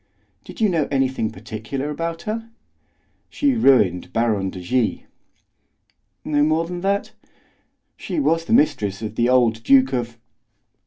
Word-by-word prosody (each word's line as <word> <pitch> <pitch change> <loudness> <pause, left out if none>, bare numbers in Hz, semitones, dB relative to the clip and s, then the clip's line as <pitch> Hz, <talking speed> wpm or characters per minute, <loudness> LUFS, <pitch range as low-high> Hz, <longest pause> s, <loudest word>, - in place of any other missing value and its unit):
"Do - - -11
you 220 - +3
know 165 -6 0
anything 130 -5 0
particular 110 +7 -6
about 165 +2 -4
her?" 225 +2 -4 0.8
"She 285 -2 +1
ruined 125 - +3
Baron 110 -4 0
de 95 - -8
G." 115 +6 -1 1.2
"No 145 -1 +1
more 155 +2 +2
than 175 +1 -6
that?" 200 +1 -1 0.9
"She - - -4
was 165 - +1
the - - -6
mistress 110 - +1
of 110 - -4
the 120 +2 +1
old 120 -3 +3
Duke 135 +2 +4
of..." 120 -2 -3
135 Hz, 140 wpm, -21 LUFS, 115-165 Hz, 1.2 s, Duke